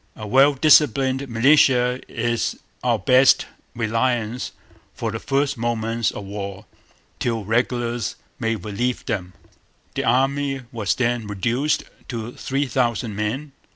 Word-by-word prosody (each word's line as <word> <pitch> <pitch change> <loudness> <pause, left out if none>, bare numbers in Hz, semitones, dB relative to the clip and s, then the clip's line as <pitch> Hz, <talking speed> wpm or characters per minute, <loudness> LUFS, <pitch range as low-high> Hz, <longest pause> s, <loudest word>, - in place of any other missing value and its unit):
A 110 - -7
well 135 +6 +5
disciplined 135 -2 +4
militia 125 0 +4
is 120 0 -1 0.3
our - - +2
best 130 +1 +5 0.3
reliance 115 +1 -1 0.4
for 115 - -3
the 115 - -4
first 135 -1 0
moments 115 -1 0
of 105 - -7
war, 100 -1 -6 0.5
till 115 -4 -1
regulars 120 0 0 0.2
may 115 0 0
relieve 110 +5 -3
them.' 90 -5 -3 0.6
The - - -2
Army 135 +2 +1
was 110 -5 -1
then 120 -3 0
reduced 120 +9 0 0.2
to 115 -1 -5
three 135 +3 -2
thousand 120 -4 -1
men. 115 +8 -3
120 Hz, 120 wpm, -22 LUFS, 110-130 Hz, 0.6 s, well